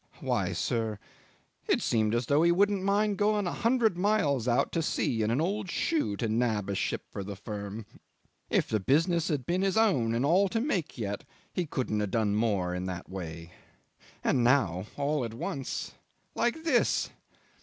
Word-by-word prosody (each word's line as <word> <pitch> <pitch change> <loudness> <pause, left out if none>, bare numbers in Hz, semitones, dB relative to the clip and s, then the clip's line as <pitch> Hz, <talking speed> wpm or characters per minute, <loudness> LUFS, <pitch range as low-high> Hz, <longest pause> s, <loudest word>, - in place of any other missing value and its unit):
'"Why, - - 0
sir 110 -2 -1 0.7
it - - +3
seemed 110 -1 +1
as 120 +1 0
though 145 +5 +3
he 170 +1 +5
wouldn't 200 +2 +3
mind 200 +1 +1
going 210 -1 +2
a 175 - -2
hundred 230 -6 +2
miles 150 - +2
out 120 0 +2
to 165 - 0
sea 120 -6 0
in 110 - +1
an 120 +4 +1
old 195 +4 -1
shoe 130 -13 0
to 115 - -1
nab 110 -3 0
a - - -1
ship 95 - -2
for 100 - -5
the 100 +1 -6
firm. 105 +1 -6 0.6
If - - +2
the 110 - 0
business 165 - +2
had 145 -7 -1
been 180 +5 0
his 195 +2 +1
own 130 - +3
and 120 +4 +1
all 185 +6 +4
to 225 - 0
make 190 - -1
yet, 100 -3 -3 0.3
he 175 -3 -1
couldn't 125 -7 -1
have 105 -1 -1
done 105 -1 +1
more 100 -5 +1
in 90 +1 -3
that 90 0 -6
way. 85 -2 -7 0.7
And 125 - +2
now... 105 -8 +2
all 145 -1 0
at 115 -1 -5
once... 135 +2 -4 0.4
like 240 +7 0
this! 275 -8 +2
130 Hz, 185 wpm, -29 LUFS, -, 0.7 s, he